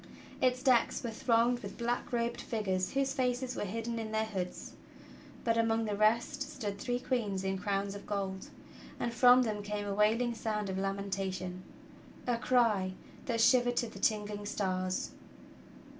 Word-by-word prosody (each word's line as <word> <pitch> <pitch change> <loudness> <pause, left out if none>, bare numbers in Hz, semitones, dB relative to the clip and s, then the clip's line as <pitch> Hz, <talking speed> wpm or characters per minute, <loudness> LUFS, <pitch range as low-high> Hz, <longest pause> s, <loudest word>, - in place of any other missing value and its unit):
Its 255 0 +2
decks 255 -3 +3
were 235 - -2
thronged 235 +1 +2
with 200 -3 -8
black 240 +1 -2
robed 235 -1 -1
figures 190 -5 -1
whose 270 0 +1
faces 255 -1 0
were - - -2
hidden 230 +3 -3
in 220 -1 -4
their 220 0 +1
hoods; 190 -4 -5 0.7
but 230 -1 +2
among 225 0 +2
the 210 -1 -1
rest 215 +3 +2
stood 205 -6 -4
three 245 +3 -1
queens 215 -7 -1
in 190 0 0
crowns 195 0 -1
of 200 0 -9
gold, 195 -2 -3 0.5
and 235 - -1
from 250 +1 +7
them 215 -3 -2
came 205 0 -3
a 200 - -2
wailing 225 +4 +2
sound 210 -3 -2
of 190 - -2
lamentation 195 -2 -3 0.3
— - - -20 0.2
a 240 -2 0
cry 225 -7 +2 0.3
"that 235 -3 0
shivered 245 +1 +4
to 240 - +1
the 220 - -10
tingling 210 -1 0
stars." 185 -2 -1
220 Hz, 165 wpm, -32 LUFS, 200-240 Hz, 0.7 s, from